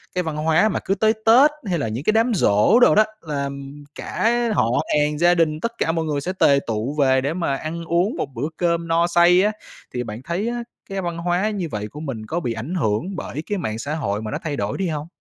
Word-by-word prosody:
cái 180 - +1
văn 160 -2 -4
hóa 160 +7 +3
mà - - -1
cứ 195 - +1
tới 220 +2 +3
Tết 255 +7 +7
hay 180 -4 -1
là 140 - -1
những 115 +6 -4
cái 215 - +2
đám 230 +2 +2
giỗ 105 - +4
đồ 245 - +6
đó 215 - +7 0.2
là 140 -3 -3 0.5
cả 225 +2 0 0.2
họ 115 -6 +2 0.3
hàng, 150 0 0
gia 175 +3 +4
đình, 155 -2 +1
tất 230 +7 -2
cả 165 - +1
mọi 165 -1 -1
người 145 -2 -1
sẽ 185 - -3
tề 140 -1 +5
tụ 115 +5 -2
về 130 -1 +4
để 140 +3 -1
mà 165 -6 -1
ăn 165 +4 -5
uống 175 - +1
một - - -2
bữa 135 +6 -2
cơm 170 -1 0
no 165 +1 +2
say 175 +1 +5
á. 210 - +2 0.4
Thì 125 - -2
bạn 110 0 -7
thấy 175 +8 -2
á 240 0 -3 0.3
cái 195 0 -3
văn 170 -2 -4
hóa 180 +5 0
như 195 -5 -3
vậy 105 0 -4
của 145 +7 -10
mình 130 -8 -5
có 165 +10 -2
bị 120 -9 -2
ảnh 120 +11 -5
hưởng 155 - -1
bởi 155 -3 -5
cái 205 - 0
mạng 110 - -3
xã 145 +5 -3
hội 110 -9 -2
mà 110 -1 -5
nó - - -2
thay 150 -3 -2
đổi - - -2
đi 195 - -1
hông? 155 -2 -4
165 Hz, 255 wpm, -22 LUFS, 140-185 Hz, 0.5 s, Tết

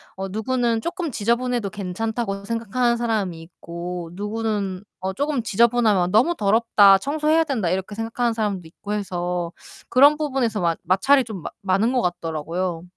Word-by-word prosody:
어 195 0 -4
누구는 230 +3 0
'쪼끔 345 - -3
지저분해도 235 0 0
괜찮다.'고 200 +1 -3
생각하는 230 +2 0
사람이 210 -8 -1
있고 170 +1 -7
누구는 205 -2 -3 0.2
어 190 +1 -2
쪼끔 285 0 -1
지저분하면 220 -4 +3
'너무 255 +11 +3
더럽다. 205 -3 +5
청소해야 305 +5 +2
된다.' 235 - -1
이렇게 190 +3 -2
생각하는 230 +1 -1
사람도 210 -4 -2
있고 205 +5 -7
해서 180 -4 -2 0.4
그런 285 +4 +6
부분에서 260 -9 -1
마 170 -1 +1
마찰이 265 +10 +4
좀 215 -6 -7
마 - - -5
많은 195 +4 +1
것 255 -1 +1
같더라고요. 170 0 -3
210 Hz, 370 characters per minute, -22 LUFS, 185-240 Hz, 0.4 s, 그런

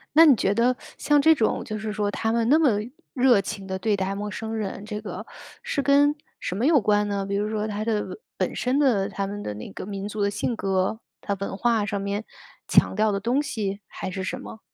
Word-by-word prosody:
那 325 +1 +9
你 280 -5 +7
觉 195 -1 +1
得 245 +3 +3 0.2
像 295 -1 +3
这 320 +2 +7
种， 230 -7 0
就 215 - -4
是 215 0 -4
说 205 -1 0
他 225 +2 -1
们 230 0 +1
那 300 +5 +6
么 310 -5 +4 0.4
热 250 -5 +5
情 195 0 -6
地 190 0 -3
对 210 +2 +1
待 190 0 -1
陌 205 +1 -4
生 220 +1 -5
人， 205 -2 -4
这 210 0 -5
个 215 - -7 0.4
是 475 -12 -1
跟 285 +1 +4 0.2
什 - - -4
么 230 +6 +1
有 305 -3 +5
关 210 -1 +2
呢？ 200 -1 -1
比 200 - -2
如 205 +1 0
说 215 -1 -1
他 210 0 -3
的 215 - -2 0.2
本 - - -1
身 255 +3 0
的 230 -9 +3
他 200 -1 -3
们 205 +1 -5
的 105 - -4
那 105 - -8
个 - - -7
民 200 -1 -4
族 210 0 -5
的 200 0 +2
性 220 +3 -1
格， 195 +1 0 0.2
他 200 - -2
文 200 -1 -3
化 225 -1 +2
上 205 -1 -2
面 200 +2 -2 0.4
强 - - +4
调 215 0 +2
的 200 -1 -1
东 245 +8 +1
西， 205 -7 -3
还 190 - -5
是 190 0 -4
什 185 - -3
么？ 220 - -9
210 Hz, 255 characters per minute, -25 LUFS, 200-235 Hz, 0.4 s, 那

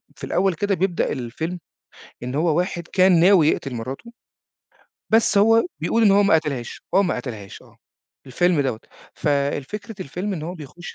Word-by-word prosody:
في - - -16
الأول 190 +1 +1
كده 200 +4 -1
بيبدأ 180 -1 0
الفيلم، 160 +9 -4 0.6
إن 125 +2 -4
هو 160 +1 +1
واحد 175 -2 -2
كان 185 -2 +4
ناوي 175 -3 +5
يقتل 135 -4 -1
مراته، 135 - -7 1.0
بس 220 -2 +4
هو 225 - +4
بيقول 230 - +1
إن 205 - +6
هو 200 +1 +5
ما 200 - +4
قتلهاش، 140 -7 -2
هو 195 - +5
ما 180 - -1
قتلهاش 110 -6 -8
آه، - - -21 0.5
الفيلم 170 +4 +1
دوّة، 125 -5 -2 0.3
ف 150 - -3
الفكرة 145 +9 -2
الفيلم 180 +8 -4
إن 160 -5 -5
هو 175 +3 -5
بيخُش 170 +2 -10
170 Hz, 170 wpm, -22 LUFS, 140-195 Hz, 1.0 s, إن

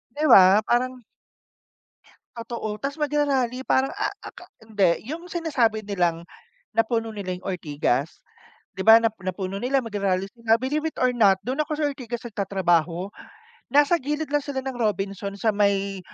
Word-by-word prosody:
'Di 300 - -1
ba 195 0 +8
parang 255 +1 0 1.4
Totoo, 230 -2 -5
tapos 280 +7 -5
magra-rally 270 -4 0
parang 265 +1 +2
a 410 +3 -2
a 400 - -11
aka 365 - -14 0.2
hindi, 205 -6 +1
yung 330 +3 -6
sinasabi 275 -11 0
nilang 175 -5 -1 0.6
napuno 225 0 +1
nila 200 -4 -5
yung 180 +1 -10
Ortigas, 150 -4 -2 0.5
di 190 - -9
ba, 220 +3 +8
na 225 -1 +2
napuno 185 +1 -4
nila, 260 +2 0
magra-rally 200 -4 -1
sila. 230 -1 +2
Believe 295 +6 -2
it - - -12
or 255 0 +2
not, 205 -6 +4
dun 260 +5 -2
ako 305 0 -1
sa 305 - -1
Ortigas 250 -5 -5
nagtatrabaho. 190 -4 0 0.6
Nasa 290 +4 +5
gilid 300 +2 -3
lang 295 0 +2
sila 275 -2 -4
ng 265 -1 -4
Robinsons 200 -2 -3
sa - - +6
may 200 -1 0
225 Hz, 155 wpm, -24 LUFS, 195-270 Hz, 1.4 s, ba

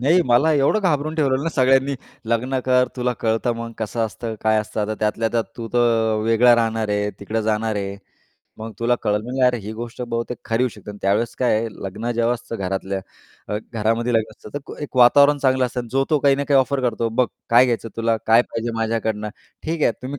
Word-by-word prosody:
नाही, 160 +8 +4
मला 125 +6 +4
एवढं 145 +9 +2
घाबरून 155 -5 0
ठेवलं 140 -4 +1
ना 165 - -1
सगळ्यांनी, 135 0 +3 0.3
"लग्न 125 +3 0
कर. 125 0 +3
तुला 125 0 0
कळतं 115 +2 +1
मग 115 0 -6
कसं 115 +1 -3
असतं, 110 +1 -6
काय 110 0 +2
असतं. 110 0 -3
आता 105 +1 -1
त्यातल्या 110 +1 0
त्यात 115 -1 +1
तू 115 - -5
तर 115 -2 +2
वेगळा 115 +2 +5
राहणार 115 -2 0
आहे, 105 0 0
तिकडं 110 +3 -2
जाणार 110 0 -1
आहे, 100 0 -4 0.6
मग 110 +1 -7
तुला 120 +1 +2
कळल." 105 -1 0
म्हणलं, 125 +3 0
अरे 125 -1 +2
ही 105 +1 -7
गोष्ट 120 +2 -7
बहुतेक 115 0 -3
खरी 115 +2 0
होऊ 130 - +2
शकते 105 - -10
आणि 100 - -10
त्यावेळेस 100 +4 +1
काय 125 -4 +2
आहे, 115 - -2 0.2
लग्न 105 +5 -4
जेव्हा 120 +1 +1
असतं 120 -1 -7
घरातल्या 95 0 -3 0.5
अ, 105 - -1 0.2
घरामध्ये 115 +2 0
लग्न 110 -1 +1
असतं, - - -13
तर 145 - -1
एक - - -11
एक 145 - -7
वातावरण 140 +4 +6
चांगलं 130 -1 +2
असतं 125 +1 -4
आणि 120 - -8
जो 135 0 +2
तो 155 - +4
काही 140 -1 +4
ना 140 - -1
काही 140 -2 +5
ऑफर 135 +1 -1
करतो, 115 -2 0
"बघ 120 +2 +1 0.2
काय 120 +2 +7
घ्यायचं 115 -2 -1
तुला? 115 0 +1
काय 115 +2 +6
पाहिजे 115 -1 -4
माझ्याकडनं?" 110 -1 -1 0.3
"ठीक 160 0 -3
आहे, - - +4
तुम्ही 135 +3 -5
115 Hz, 220 wpm, -21 LUFS, 110-130 Hz, 0.6 s, काय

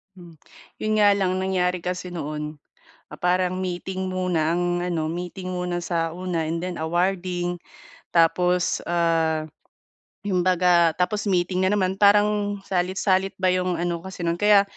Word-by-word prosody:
Mm. 170 -4 -14 0.4
'Yon 215 0 -1
nga 205 -1 +5
lang 190 -2 +1
nangyari 180 -2 0
kasi 180 0 -3
noon, 150 -3 -5 0.5
ah, - - -10
parang 180 +1 +1
meeting 185 +1 -4
muna, 180 -4 0
ang 175 0 0
ano, 165 -3 -1
meeting 180 +2 -5
muna 180 -1 -2
sa 165 -2 -1
una 175 -2 -2
and 165 +1 -2
then 180 0 -4
awarding 175 +1 -1 0.5
tapos, 180 +2 +2
ah, 165 -2 +1 0.8
'yong 195 -3 0
'baga 175 -2 +3
tapos 205 +3 -1
meeting 185 0 +1
na - - +2
naman, 190 -1 0
parang 205 0 +3
salit-salit 190 +1 0
ba 185 -1 +1
'yong 180 -1 0
ano 170 0 -2
kasi 190 +1 -8
no'n, 170 0 -1
kaya 205 -1 +6
180 Hz, 145 wpm, -24 LUFS, 170-185 Hz, 0.8 s, kaya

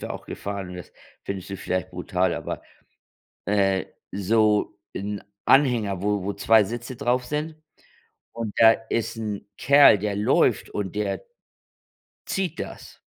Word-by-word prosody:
sind - - -16
wir - - -4
auch - - -8
gefahren. 100 -2 -5
Das 90 - -10 0.3
findest 95 -1 -5
du 100 - -4
vielleicht 95 0 -3
brutal, 90 +1 0
aber, - - -5 0.8
äh, 95 -2 +2 0.3
so 105 +2 +2 0.2
'n 100 +1 -4 0.2
Anhänger, 115 -9 +3
wo 105 -1 0
wo 100 +2 -3
2 110 +2 +5
Sitze 120 +4 -5
drauf 125 -1 0
sind. 150 +4 -3 0.8
Und 115 -3 -4
da 115 0 +8 0.2
ist 115 0 -1
'n 105 -2 -4
Kerl, 140 -6 +7
der 100 0 -2
läuft 105 - +2
und 100 -1 -4
der 100 -2 -2 1.0
zieht 190 -2 -2
das. - - -8
105 Hz, 140 wpm, -25 LUFS, 100-115 Hz, 1.0 s, da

